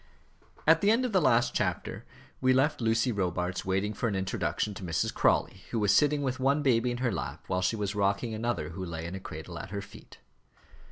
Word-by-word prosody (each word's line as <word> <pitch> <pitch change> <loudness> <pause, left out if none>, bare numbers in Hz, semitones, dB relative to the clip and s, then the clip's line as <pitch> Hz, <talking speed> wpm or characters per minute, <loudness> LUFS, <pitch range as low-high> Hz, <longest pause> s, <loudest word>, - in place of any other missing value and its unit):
At 160 +1 +5
the 200 - +3
end 235 +4 +3
of 250 - -2
the 190 -3 +3
last 120 -4 +3
chapter, - - -2 0.4
we 130 0 +4
left 135 +2 +2
Lucy 115 +2 +2
Robarts 90 -3 -2
waiting 95 +3 0
for 115 - -1
an 100 - -2
introduction 95 +2 -1
to 95 - -9
Mrs. 85 -3 -1
Crawley, 95 - +1
who 120 - -2
was 105 -1 +3
sitting 150 +3 +3
with 130 -1 -2
one 140 +3 +2
baby 125 -3 +3
in 120 - -2
her 120 - +2
lap - - -5
while 90 - -1
she 95 - +1
was 105 -2 -2
rocking 100 +3 0
another 110 -8 -2
who 90 +3 -6
lay 85 -2 -5
in 85 - -5
a 95 - -5
cradle 85 -1 -8
at - - -7
her 100 +1 -4
feet. 95 - -14
105 Hz, 220 wpm, -29 LUFS, 95-130 Hz, 0.4 s, At